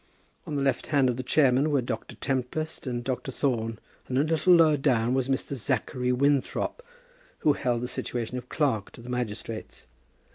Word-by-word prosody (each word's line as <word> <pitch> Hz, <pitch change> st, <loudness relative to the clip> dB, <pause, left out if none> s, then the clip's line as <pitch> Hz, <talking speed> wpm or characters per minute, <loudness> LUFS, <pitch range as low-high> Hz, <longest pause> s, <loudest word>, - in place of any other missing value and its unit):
On 150 Hz, -, -3 dB
the 140 Hz, -, 0 dB
left 135 Hz, -3 st, 0 dB
hand 140 Hz, -4 st, +3 dB
of 120 Hz, -, -5 dB
the -, -, -2 dB
chairman 135 Hz, +2 st, +3 dB
were 145 Hz, -2 st, +3 dB
Dr. 125 Hz, -, -4 dB
Tempest 135 Hz, +4 st, -3 dB
and 120 Hz, -1 st, -2 dB
Dr. 130 Hz, +1 st, -3 dB
Thorne, 115 Hz, -4 st, -1 dB, 0.3 s
and 130 Hz, -, -1 dB
a 140 Hz, -, +4 dB
little 165 Hz, +3 st, +4 dB
lower 160 Hz, -3 st, +6 dB
down 125 Hz, -4 st, +2 dB
was 130 Hz, 0 st, 0 dB
Mr. 135 Hz, +1 st, -1 dB
Zachary 125 Hz, 0 st, -1 dB
Winthrop, 140 Hz, -, +1 dB, 0.6 s
who 150 Hz, -, +4 dB
held 120 Hz, -4 st, -1 dB
the 125 Hz, -, -2 dB
situation 120 Hz, -1 st, -3 dB
of 125 Hz, -, -14 dB
clerk 130 Hz, -10 st, 0 dB
to -, -, -12 dB
the 120 Hz, -, -10 dB
magistrates. 115 Hz, -2 st, -5 dB
130 Hz, 180 wpm, -27 LUFS, 120-145 Hz, 0.6 s, lower